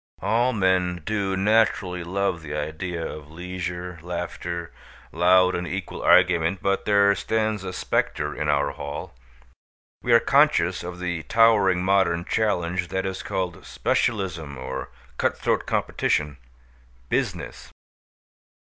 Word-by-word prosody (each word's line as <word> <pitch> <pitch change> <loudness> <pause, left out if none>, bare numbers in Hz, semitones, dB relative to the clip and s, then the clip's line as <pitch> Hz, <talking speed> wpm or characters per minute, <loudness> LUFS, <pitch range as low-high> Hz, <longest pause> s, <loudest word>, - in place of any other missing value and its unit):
All 120 +3 +2
men 95 -5 +1
do 100 -3 -1
naturally 95 -3 +2
love 90 -1 -1
the 75 -2 -6
idea 80 +2 -4
of 75 -1 -8
leisure, 90 +1 -5
laughter, 85 0 -5 0.4
loud 90 +2 +4
and 90 0 -3
equal 95 +3 -5
argument; 90 0 +4
but 100 0 0
there 100 -1 +5
stands 110 +1 -1
a 95 - -4
specter 75 -4 -1
in 75 - -2
our 70 -1 +2
hall. 70 +1 -7 0.9
We 120 - -1
are 115 - +8
conscious 135 - +3
of 90 0 -7
the 90 -2 -3
towering 105 -6 +4
modern 95 -3 +2
challenge 90 -4 0
that 95 +2 -2
is 95 0 -3
called 90 -3 -3
specialism 85 - -1
or 65 +1 -5 0.3
cut - - +1
throat - - 0
competition 75 -2 0 0.7
Business. - - -3
90 Hz, 125 wpm, -24 LUFS, 85-100 Hz, 0.9 s, are